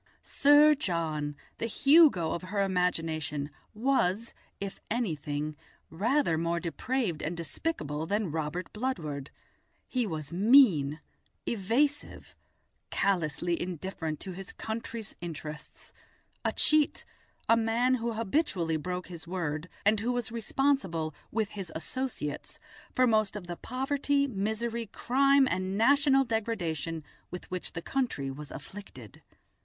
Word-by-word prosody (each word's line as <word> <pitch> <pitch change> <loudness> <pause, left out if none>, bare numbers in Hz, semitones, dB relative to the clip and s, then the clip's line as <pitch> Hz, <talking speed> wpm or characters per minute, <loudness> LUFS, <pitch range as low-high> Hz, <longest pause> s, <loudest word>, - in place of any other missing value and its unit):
Sir 290 +2 +6
John, 160 - -2 0.2
the 230 - -1
Hugo 275 - +5
of 170 - -2
her 200 +2 -2
imagination, 160 -6 -1 0.2
was, 230 -3 +1 0.3
if 200 -1 -5
anything, 155 - -2 0.4
rather 205 - +2
more 170 +1 0
depraved 185 - -2
and 165 +2 -3
despicable 160 - -3
than 205 -3 0
Robert 160 +3 -3
Bludward. 155 - -3 0.6
He 250 -3 0
was 155 -3 -5
mean, 185 - +5 0.5
evasive, 250 +8 0 0.5
callously 175 -2 0
indifferent 175 -3 -4
to 190 - -5
his 185 +1 -8
country's 225 -1 -5
interests, 155 -2 -8 0.5
a - - +1
cheat, 305 -1 +3 0.4
a 230 - +6
man 230 +3 +2
who 235 -2 0
habitually 195 - 0
broke 180 +3 -4
his 175 -2 -9
word, 170 -2 -3 0.2
and 210 +1 +4
who 235 +4 0
was 245 -2 -2
responsible, 225 - 0 0.2
with 215 -2 0
his 195 -5 -6
associates, 165 - -4 0.4
for 255 - +5
most 215 -3 +2
of 205 -4 -5
the 175 0 -5
poverty, 280 +5 0
misery, 225 0 -2
crime, 275 +5 +3
and 185 -2 -1
national 270 +3 +5
degradation 175 - -2 0.3
with 180 - -7
which 185 -1 -4
the 165 - -5
country 235 - -1
was 145 +1 -8
afflicted. 140 - -10
195 Hz, 120 wpm, -30 LUFS, 165-240 Hz, 0.6 s, Sir